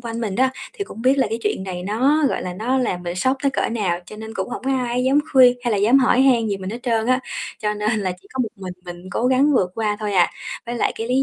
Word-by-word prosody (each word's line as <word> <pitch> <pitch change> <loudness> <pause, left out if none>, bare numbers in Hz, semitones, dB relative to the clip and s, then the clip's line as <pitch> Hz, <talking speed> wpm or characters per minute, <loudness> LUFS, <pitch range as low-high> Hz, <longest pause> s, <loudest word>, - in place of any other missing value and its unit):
quanh 230 -1 -5
mình 205 -5 -2
á, 260 +2 +3 0.2
thì 400 - -4
cũng 225 - -10
biết 260 +2 +4
là 265 - +3
cái 225 - -1
chuyện - - -1
này 180 -2 -5
nó, 265 +10 +2
gọi - - -2
là, 180 - -4
nó 245 +7 0
làm 185 -8 -1
mình 175 0 -4
sốc 260 +8 +1
tới 280 - +2
cỡ - - -1
nào, 200 -7 -1
cho 215 - -10
nên 220 +1 -8
cũng - - -3
hổng 245 - -6
có 270 - 0
ai 250 0 -1
dám 270 +2 +4
khuyên 250 -2 +7
hay 240 - +1
là - - +2
dám 230 +7 +5
hỏi 255 -1 +3
han 245 -4 +4
gì 200 - -1
mình 190 0 -6
hết 235 - -5
trơn 230 -2 0
á, 255 +1 +2 0.4
cho 210 -1 -1
nên 210 +1 0
là 185 -2 -1
chỉ - - -22
có 265 - -5
một 225 - -2
mình 185 -2 -7
mình 175 -1 -8
cố 235 - 0
gắng 265 +3 +4
vượt 185 -8 +2
qua 215 -2 -1
thôi 210 -1 -2
à. 180 -3 +4 0.4
Với 240 - -3
lại 235 - 0
cái 225 +1 -5
lý 260 +2 +3
230 Hz, 300 wpm, -21 LUFS, 205-255 Hz, 0.4 s, khuyên